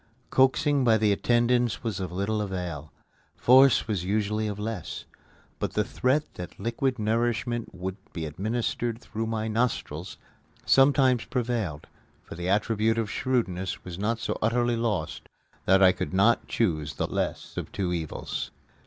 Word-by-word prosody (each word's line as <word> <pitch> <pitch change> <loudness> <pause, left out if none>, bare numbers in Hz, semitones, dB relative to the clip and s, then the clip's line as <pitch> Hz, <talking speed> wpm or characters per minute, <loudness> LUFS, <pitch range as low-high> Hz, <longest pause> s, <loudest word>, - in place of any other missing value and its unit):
Coaxing 140 +2 +3
by 115 -3 +5
the 105 -1 +3
attendants 120 +3 +2
was 110 -5 -2
of 95 -3 -4
little 100 +4 -1
avail; 90 -7 -4 0.5
force 130 0 +6
was 100 -6 -1
usually 105 +2 0
of 105 -1 -4
less. 105 -3 -5 0.5
But - - -2
the 105 - +2
threat 130 +7 +1
that 90 - -9
liquid 120 +5 -1
nourishment 115 0 -1
would 95 +1 -4
be 80 -2 -4
administered 115 +7 -2
through 115 -2 -4
my 110 -1 -2
nostrils 115 +3 -2 0.5
sometimes 135 -3 +4
prevailed 115 - -2 0.4
for - - -10
the 90 +2 -4
attribute 110 +2 +2
of 110 -3 -1
shrewdness 95 -8 -1
was 90 0 -7
not 115 +3 0
so 120 - -3
utterly 120 +2 +2
lost 115 -4 -2 0.4
that 95 +1 +5
I 95 - +8
could 95 - -4
not 110 +5 +3
choose 75 -10 -1
the - - -1
less - - -3
of - - -5
two 90 -3 -1
evils. 80 -3 -4
110 Hz, 150 wpm, -27 LUFS, 95-120 Hz, 0.5 s, I